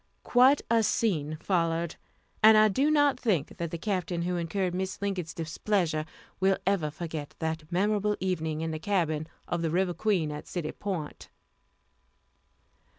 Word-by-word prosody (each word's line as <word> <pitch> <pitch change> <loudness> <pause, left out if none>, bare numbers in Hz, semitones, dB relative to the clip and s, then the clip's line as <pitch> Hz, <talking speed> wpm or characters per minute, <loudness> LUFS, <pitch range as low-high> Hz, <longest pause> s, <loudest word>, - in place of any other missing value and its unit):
Quite 260 +3 +5
a 230 0 +3
scene 155 -9 0
followed, 165 -2 0 0.5
and 220 0 +8
I 215 0 +6
do 270 +9 +2
not 290 -4 +3
think 180 - 0
that 170 -1 -3
the 170 - -4
Captain 180 -2 -2
who 180 +1 -1
incurred 175 +2 -1
Mrs. 190 +1 -3
Lincoln's 190 -5 -2
displeasure 165 -1 -1 0.3
will 190 0 +3
ever 185 -6 +1
forget 155 -1 -6
that 160 0 -4
memorable 210 +3 +1
evening 160 -4 -2
in 165 0 -2
the 155 - -4
cabin 160 -4 0 0.2
of 175 - -2
the 165 - 0
River 180 +2 +1
Queen, 175 -4 0
at 150 - -7
City 170 -4 -3
Point. 180 -7 -5
175 Hz, 155 wpm, -28 LUFS, 160-205 Hz, 0.5 s, and